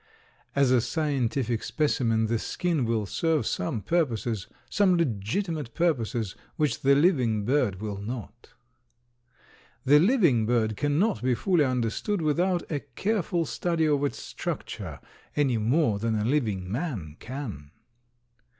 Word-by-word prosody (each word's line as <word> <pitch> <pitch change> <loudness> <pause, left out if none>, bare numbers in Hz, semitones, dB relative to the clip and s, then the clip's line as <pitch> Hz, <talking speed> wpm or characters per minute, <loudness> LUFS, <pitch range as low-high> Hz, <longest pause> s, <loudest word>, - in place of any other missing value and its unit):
As 140 -2 +4
a 125 -2 +5
scientific 130 -5 -1
specimen 120 -3 +1
the 115 0 0
skin 165 -3 -1
will 115 -2 0
serve 160 - 0
some 130 -10 -2
purposes, 120 - 0 0.2
some 190 -3 +3
legitimate 145 - -2
purposes, 120 - 0 0.2
which 150 -2 0
the 140 +1 +5
living 130 - +2
bird 120 -7 +1
will 105 -2 -4
not. 115 +2 -7 1.4
The 145 +3 +7
living 170 - +3
bird 110 -2 +1
cannot 145 - +1
be 125 0 +2
fully 175 +1 +2
understood 130 - -1
without 175 +4 +1
a 150 - 0
careful 170 - -1
study 165 -2 0
of 145 -2 +2
its 145 - -1
structure - - -5 0.4
any 135 -6 +2
more 115 -1 +2
than 115 +1 0
a 105 0 0
living 110 -9 0
man 110 - -3
can. 115 - -7
130 Hz, 130 wpm, -27 LUFS, 110-160 Hz, 1.4 s, The